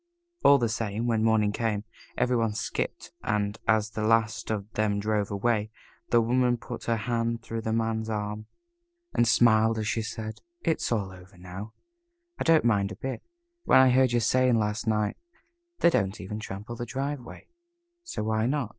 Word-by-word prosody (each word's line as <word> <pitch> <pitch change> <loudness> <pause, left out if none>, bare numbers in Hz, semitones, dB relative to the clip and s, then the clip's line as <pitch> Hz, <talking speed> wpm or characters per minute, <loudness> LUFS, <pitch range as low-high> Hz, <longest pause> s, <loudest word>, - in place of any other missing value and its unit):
All 140 - +8
the 120 -3 +1
same, 110 0 -2
when 115 -2 +1
morning 110 -2 +3
came, 105 -2 -1 0.3
every 125 0 +2
one 115 -3 0
skipped, 110 - -3
and 105 0 -1
as 110 0 +2
the 110 - -4
last 115 0 +1
of 105 -2 -2
them 105 -1 +1
drove 105 -1 0
away, 105 +1 0 0.4
the 120 - +5
Woman 125 +1 +2
put 120 0 -8
her 115 - +1
hand 115 0 -1
through 115 0 -4
the 110 - -2
Man's 110 0 -1
arm, 105 0 -3 0.7
and 120 - +3
smiled 110 -1 +4
as 110 -1 -2
she 115 +1 0
said: 110 0 -6 0.2
"It's 160 - 0
all 100 -5 0
over. 90 0 -15 1.0
I - - 0
don't 165 -5 +4
mind 100 -3 +2
a - - -6
bit. 130 +5 -5 0.4
When - - +6
I 130 -1 +6
heard 130 0 +4
you 120 - +3
saying 125 +1 +3
last 105 +2 -1
night, 105 -1 +1 0.6
'They 170 - +6
don't 95 - 0
even 105 +2 -5
trample 105 +2 -7
the 120 +1 -5
driveway, 135 +1 -5 0.6
so 345 - -4
why 110 +1 +1
not?' 135 -4 -1
110 Hz, 175 wpm, -27 LUFS, 105-120 Hz, 1.0 s, All